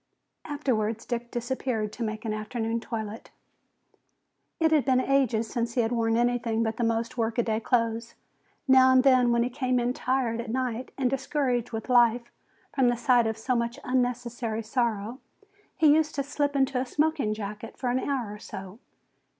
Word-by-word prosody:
Afterwards 230 -7 -1
Dick 240 -1 -4
disappeared 240 -3 -2
to 240 - -9
make 215 0 -3
an 215 - -1
afternoon 225 +2 -2
toilet. 220 -1 -6 1.3
It 320 -1 +3
had 305 -3 +4
been 260 -2 +3
such 255 - 0
ages 245 -5 +2
since 235 0 -3
he 245 - +3
had 225 0 -1
worn 230 -1 +1
anything 235 -2 +1
but 220 -1 -2
the 240 - -1
most 230 +1 -1
workaday 225 -1 0
clothes. 230 0 -1 0.5
Now 260 0 +7
and 260 0 +5
then 255 -3 +5
when 235 0 +3
he 245 - -1
came 255 -1 0
in 240 +1 0
tired 250 -3 -1
at 235 - -8
night 255 0 -2
and 265 -2 +1
discouraged 255 -2 -1
with 225 -1 -5
life 240 -1 +3 0.4
from 265 -3 +3
the 240 - 0
sight 245 -2 +3
of 220 0 -2
so 250 +3 -1
much 235 0 -1
unnecessary 245 -3 -1
sorrow, 230 0 -1 0.6
he 310 -4 +6
used 310 0 +1
to 280 - 0
slip 285 0 -1
into 270 -1 +2
a - - -2
smoking 295 -7 0
jacket 210 +1 -7
for 250 -2 -1
an 255 - +1
hour 255 -7 -2
or 210 - -10
so. 195 +2 -9
240 Hz, 180 wpm, -27 LUFS, 225-260 Hz, 1.3 s, Now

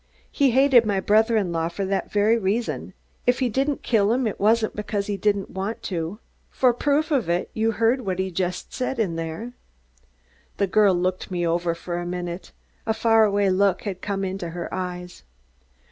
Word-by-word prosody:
He 280 -2 +3
hated 260 -1 +5
my 205 -3 0
brother 220 +3 +3
in 195 -5 0
law 165 -1 0
for 195 +3 -3
that 195 0 -2
very 210 +2 +3
reason. 225 +2 -2 0.3
If 245 +1 +4
he 255 -2 0
didn't 275 +4 -1
kill 210 -3 +2
him, 250 +2 +1
it 215 - -3
wasn't 220 +2 +2
because 205 -1 -2
he 205 - -2
didn't 200 -1 0
want 195 +4 -4
to. 170 +1 -3 0.3
For 250 -2 +3
proof 290 +5 0
of 255 - +1
it, 175 +1 -1
you 225 +1 +1
heard 230 +4 +2
what 190 -5 -3
he 190 -1 -2 0.2
said 255 +8 -4
in 195 -7 0
there." 165 +9 -5 1.0
The 200 - +2
girl 200 0 +4
looked 185 +1 -1
me 175 -2 -1
over 170 0 0
for 175 +1 -4
a 175 - -4
minute. 175 0 -5 0.4
A 220 - +1
far 225 0 +4
away 200 -1 +2
look 195 0 +2
had 190 -3 -5
come 195 -1 -2
into 185 -2 -4
her 170 +1 -6
eyes. 180 -1 -5
200 Hz, 190 wpm, -24 LUFS, 180-225 Hz, 1.0 s, hated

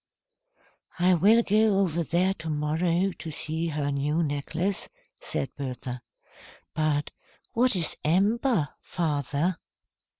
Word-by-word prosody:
"I 180 +1 +4
will 210 +7 +5
go 215 -1 +3
over 170 -4 +1
there 175 +5 +1
to 160 -3 -6
morrow 165 +5 +1
to 165 - -8
see 160 +2 -2
he 145 -2 -1
new 145 +4 0
necklace," 160 +6 -2 0.3
said 135 - -3
Bertha. 125 -2 -5 0.7
"But 150 -1 0 0.4
what 245 -1 +3
is 170 -4 0
amber, 200 - +2
father?" 150 +1 -1
165 Hz, 110 wpm, -27 LUFS, 150-190 Hz, 0.7 s, will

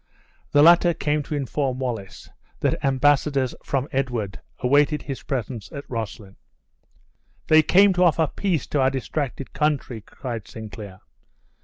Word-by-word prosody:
The 145 - +5
latter 170 +1 +6
came 150 -1 0
to 150 +1 -5
inform 135 -1 -2
Wallace 120 -7 -5 0.3
that - - 0
embassadors 135 -1 +2
from 135 0 -1
Edward 120 -7 -2 0.2
awaited 145 +3 +2
his 135 -2 -6
presence 120 -7 -4
at 140 - -8
Roslyn. 110 -4 -6 1.1
"They 155 0 +7
came 195 +5 +5
to 180 0 +3
offer 160 -1 +3
peace 175 +1 -2
to 145 - +1
our 130 - +4
distracted 135 0 -4
country," 145 -6 -1
cried 115 0 -7
Sinclair. 105 -3 -9
135 Hz, 135 wpm, -23 LUFS, 120-150 Hz, 1.1 s, They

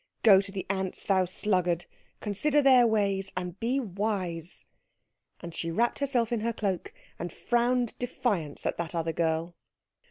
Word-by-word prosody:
Go 195 -4 +8
to 200 0 -6
the 190 -2 -4
ants, 190 -1 -3
thou 190 -2 +3
sluggard; 180 -2 0 0.4
consider 280 +9 +1
their 255 -3 +7
ways, 200 -3 +1
and 180 0 -4
be 250 +4 +1
wise." 185 - -3 0.8
And 170 -1 -7
she 165 - -3
wrapped 235 +8 +1
herself 255 -5 +1
in 235 - +1
her 230 +2 -1
cloak, 195 -5 -2 0.3
and 175 - -4
frowned 240 +2 +1
defiance 205 - -2
at - - -1
that 170 0 -3
other 165 -1 -1
girl. 165 +1 0
195 Hz, 155 wpm, -28 LUFS, 175-235 Hz, 0.8 s, Go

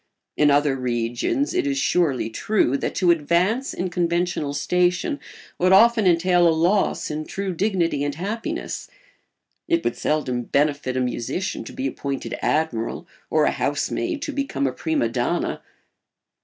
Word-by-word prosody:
In 150 - +4
other 145 -1 +3
regions 120 - -1
it 360 -5 0
is 280 -1 0
surely 155 - +1
true 165 - +1
that - - -2
to 180 -2 +4
advance 175 - +1
in 180 0 -3
conventional 170 -3 0
station 180 - 0 0.4
would 185 +1 +3
often 225 +1 +6
entail 175 0 +4
a - - +5
loss 170 +3 +1
in 155 +1 -3
true 195 +3 -4
dignity 170 -6 0
and 145 -1 -2
happiness. 225 - -4 0.8
It 335 -1 +1
would - - -1
seldom 130 -6 -1
benefit 140 -2 0
a - - +1
musician 125 +9 -2
to - - -8
be 130 - -4
appointed 135 +1 -4
admiral 150 -8 -1 0.2
or - - +3
a - - +3
housemaid 330 -4 -2
to 320 - -3
become 275 - -2
a 130 - +1
prima 160 -7 0
donna. 120 +1 -1
170 Hz, 150 wpm, -23 LUFS, 140-195 Hz, 0.8 s, often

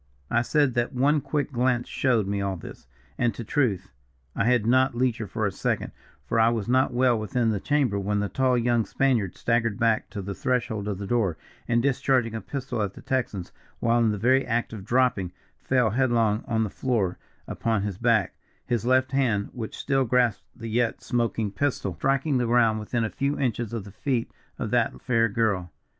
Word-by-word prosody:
"I 120 - +3
said 145 +1 +2
that 120 +3 -1
one 140 +4 +2
quick 145 +1 -2
glance 125 -1 +1
showed 120 -6 +1
me 100 0 -2
all 100 -1 -1
this, 85 - -11 0.3
and, 120 -4 +1
to 120 - -6
truth, 105 - 0 0.4
I - - +1
had 120 -3 +3
not 130 +1 +3
leisure 120 -3 0
for 110 +1 -2
a 100 - 0
second, - - -2 0.3
for 115 - 0
I 115 +1 +5
was 115 -3 -2
not 130 +2 +3
well 125 -2 +2
within 115 +1 0
the 105 - -1
chamber 135 -6 +1
when 105 +1 0
a - - -1
tall 130 +6 +1
young 120 -1 +2
Spaniard 120 -7 0
staggered 115 -3 0
back 115 -1 +1
to 100 - -6
the 100 +1 -4
threshold 115 -3 -1
of 100 -3 -2
the 100 - -5
door, 100 -7 0 0.3
and, 120 0 +2
discharging 130 -3 +1
a 110 - -4
pistol 130 -4 -4
at 100 -2 -2
the - - -12
Texans 125 -9 -2 0.3
while 120 0 +2
in 115 -1 +3
the 105 - -1
very 130 +6 +3
act 115 0 -1
of 105 -4 -7
dropping, 115 -7 +1 0.3
fell 125 -4 +1
headlong 115 -3 +2
on 110 -1 +1
the 105 - -3
floor 110 -9 -1 0.3
upon 110 -3 -1
his 100 -2 -4
back, 115 -5 +2 0.3
his 120 -1 -1
left 130 +1 +3
hand, 120 -7 +1
which 115 -4 -6
still 135 -1 +1
grasped 120 -3 +1
the 115 - -7
yet 115 +1 0
smoking 115 -4 -1
pistol, 125 -5 -1
striking 135 - +1
the 120 - 0
ground 115 -2 +3
within 115 +2 -2
a 110 - -1
few 140 +1 -1
inches 120 -4 -1
of 115 -4 -4
the 100 - -11
feet 125 +1 -2 0.3
of - - -4
that 65 - +1
fair 115 - +2
girl. 100 -5 0
115 Hz, 200 wpm, -26 LUFS, 105-125 Hz, 0.4 s, I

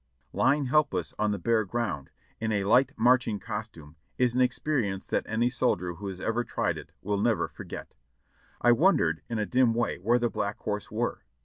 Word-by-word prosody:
Lying 145 +1 +2
helpless 125 - +1
on 105 0 +2
the 100 - -1
bare 115 0 +2
ground 105 - -3 0.3
in 110 0 -1
a 100 -2 +1
light 125 +7 +4
marching 120 -4 +3
costume 80 -4 -7 0.2
is 125 -2 +2
an 130 - +2
experience 125 -6 0
that - - 0
any 115 +2 +1
soldier 90 -8 0
who 100 +4 -7
has 95 -2 -6
ever 115 +4 0
tried - - -1
it - - -13
will 100 0 -1
never 115 0 +2
forget. - - -9 0.7
I 120 - +5
wondered 120 - +3
in 115 - -2
a 105 - 0
dim 125 0 +3
way 120 -5 -1
where 115 +7 +3
the 120 0 +1
Black 100 +1 -2
Horse 105 -1 -4
were? 115 +3 -2
115 Hz, 190 wpm, -28 LUFS, 100-125 Hz, 0.7 s, I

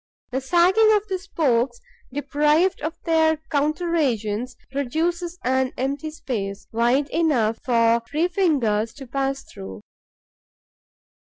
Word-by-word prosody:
The 265 +2 -1
sagging 360 +9 +4
of 420 0 +1
the 375 -1 -1
spokes, 265 -10 0 0.3
deprived 295 +6 +1
of 320 +2 -4
their 320 -1 +3
counter 310 +4 0
agents, 240 -4 -1 0.2
produces 335 +6 -2
an 260 0 +1
empty 280 +4 -2
space, 205 -10 -5
wide 240 +5 +2
enough 255 -9 +1
for 230 -1 +3
three 315 +4 +1
fingers 255 - +1
to 275 - -9
pass 275 +2 -2
through. 95 0 -10
280 Hz, 115 wpm, -23 LUFS, 240-330 Hz, 0.3 s, sagging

